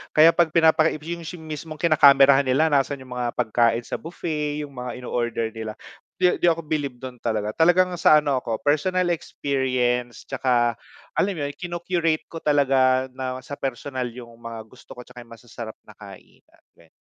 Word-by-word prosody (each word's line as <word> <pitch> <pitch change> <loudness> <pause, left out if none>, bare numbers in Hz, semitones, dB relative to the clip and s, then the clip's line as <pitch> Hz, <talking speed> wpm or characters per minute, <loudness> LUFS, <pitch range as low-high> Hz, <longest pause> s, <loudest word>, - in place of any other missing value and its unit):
Kaya 160 +2 +8
'pag 170 -1 +3
pinapaki 160 -1 +4
'yung 170 0 -6 0.2
mismong 155 0 -7
kinakamerahan 140 -4 +5
nila 150 +5 +2
nasaan 140 -1 0
'yung 130 - -16
mga 125 -1 -3
pagkain 115 0 +1
sa - - -5
buffet, 150 -3 -4
'yung 145 - -9
mga 125 -1 -7
inoorder 120 -2 -2
nila, 110 -1 -6 0.4
'di 180 -1 +2
di 175 - +2
ako 165 -1 +2
bilib 145 -4 -3
dun 125 -1 -9
talaga, 110 -2 -2
talagang 175 +4 +3
sa 155 - +6
ano 140 -3 +1
ako 115 -2 -3
personal 175 +5 +1
experience, 125 -7 -1
'tsaka 120 -3 0 0.3
alam 195 -1 0
'yun 145 -2 -3
kinu-curate 175 -2 -1
ko 165 - -6
talaga 130 -3 +2
na 130 0 -5
sa 145 +1 -8
personal 130 -1 -3
'yung 120 0 -10
mga 115 -1 -8
gusto 125 +3 -15
ko 125 - -10
'tsaka 125 -1 -13
'yung 115 - -13
masasarap 115 -1 -9
na - - -15
kainan, - - -16 0.2
gan 85 - -20
135 Hz, 170 wpm, -23 LUFS, 120-155 Hz, 0.4 s, Kaya